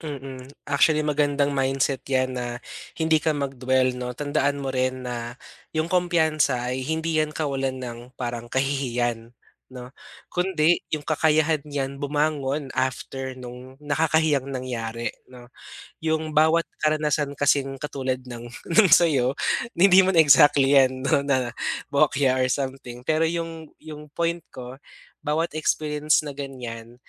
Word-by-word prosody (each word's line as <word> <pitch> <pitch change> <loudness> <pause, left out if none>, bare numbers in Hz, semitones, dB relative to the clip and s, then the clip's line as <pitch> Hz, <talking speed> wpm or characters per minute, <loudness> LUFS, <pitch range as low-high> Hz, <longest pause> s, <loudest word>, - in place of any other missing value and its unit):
Mm, 135 -4 -7 0.2
actually 150 +2 +3
magandang 145 -1 +1
mindset 135 0 0
'yan 130 -1 0
na 120 0 -4 0.4
hindi 160 0 +3
ka 155 0 +1
mag-dwell 130 -2 0
'no, 125 0 -4
tandaan 145 +1 -1
mo 135 - -4
rin 130 -1 -1
na 120 0 -6 0.3
'yung 155 +1 -1
kumpiyansa 160 -8 +1
ay 130 +1 -3
hindi 160 +2 -1
'yan 155 -1 +1
kawalan 135 -4 -2
ng 120 -2 -6
parang 120 -2 -5
kahihiyan 120 -4 -1 0.4
'no, 125 -1 -9 0.4
kundi 175 -2 +1
'yung 155 - 0
kakayahan 155 0 +1
n'yan 140 -2 -4
bumangon 145 -1 -1
after 130 +1 -2
nung 125 +2 -11
nakakahiyang 150 -1 +1
nangyari 120 -3 -4 0.2
'no. 125 -1 -13 0.5
'Yung 160 -1 -1
bawat 160 +2 +4 0.2
karanasan 150 -2 0
kasing 140 -1 +1
katulad 130 -2 -3
ng 120 -1 -8 0.4
sa'yo, 140 -6 +4 0.4
hindi 190 +1 +7
man 190 -2 +1
exactly 145 -2 +6
'yan 130 -1 +3
'no, 140 +1 +3
na 130 -4 0 0.4
bokya 140 -2 +3
or 130 - +1
something 130 -2 -4
pero 160 +2 +2
'yung 165 -2 -5
'yung 150 -1 -11
point 170 +2 -2
ko 125 0 -9 0.5
bawat 160 +3 -1
experience 150 0 +1
na 145 - -5
ganiyan, 125 -4 -8
140 Hz, 130 wpm, -24 LUFS, 130-155 Hz, 0.5 s, hindi